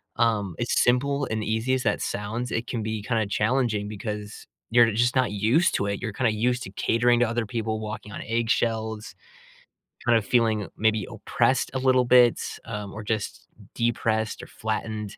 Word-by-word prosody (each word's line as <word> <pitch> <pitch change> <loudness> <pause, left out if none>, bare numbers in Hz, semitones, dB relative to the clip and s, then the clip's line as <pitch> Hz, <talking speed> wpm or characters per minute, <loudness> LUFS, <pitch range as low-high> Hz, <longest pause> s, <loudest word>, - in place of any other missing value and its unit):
Um, 105 -7 +1
as 120 - -1
simple 140 +3 +2
and 110 -1 -2
easy 110 +4 0
as 130 - 0
that - - 0
sounds, 110 +4 -3
it 115 +2 -2
can 115 - -3
be 110 -1 -3
kinda 115 -2 0
challenging 105 -1 0
because 105 0 -6 0.2
you're 120 -1 +6
just 120 +3 +2
not 130 -4 +2
used 115 - +2
to 100 - 0
it. 100 0 -3
You're 110 -4 -3
kinda 115 +2 +1
used 125 +4 0
to - - -8
catering 120 +1 +2
to 120 - +3
other 115 0 -1
people, 110 0 -3
walking 105 0 -6
on - - -6
eggshells, 115 -1 -1 0.9
kind 120 -1 +4
of 110 - -2
feeling 110 -3 +2
maybe 110 -2 +1
oppressed 130 -1 0
a 130 - +1
little 130 -1 +4
bit, 125 -1 +5 0.2
um, 105 -3 -6
or 110 - -7
just 105 - -3 0.3
depressed 110 -2 0
or - - -10
flattened, 110 -1 -4
110 Hz, 180 wpm, -25 LUFS, 105-120 Hz, 0.9 s, you're